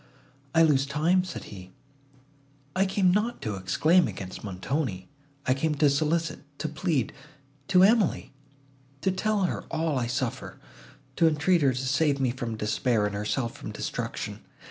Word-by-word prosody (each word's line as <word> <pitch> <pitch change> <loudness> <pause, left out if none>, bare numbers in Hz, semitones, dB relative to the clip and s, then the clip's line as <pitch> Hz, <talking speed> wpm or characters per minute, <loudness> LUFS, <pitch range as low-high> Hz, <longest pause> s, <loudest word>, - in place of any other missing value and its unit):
"I 165 - +7
lose 140 -3 +3
time," 160 +6 +2
said 185 - -6
he: 95 -1 -11 1.0
"I 190 +1 +3
came 190 -2 +3
not 215 +5 0
to 110 - -2
exclaim 150 - +3
against 95 -2 -7
Montoni; 100 +2 -3 0.3
I 130 - +3
came 150 +3 0
to 145 -1 +4
solicit, 155 +3 0 0.2
to 155 - -2
plead—to 145 - -1
Emily; 210 - +3 0.7
to 190 - +2
tell 205 +2 0
her 180 - -2
all 160 -4 0
I 120 - -1
suffer, 130 -1 -3 0.6
to 165 - +5
entreat 160 +3 +2
her 135 -2 +3
to 130 +1 -3
save 140 +1 +2
me 130 -3 +1
from 120 -2 -4
despair, 110 +1 +1
and 105 - -2
herself 105 +4 -2
from - - -7
destruction. - - -4
145 Hz, 150 wpm, -27 LUFS, 120-170 Hz, 1.0 s, I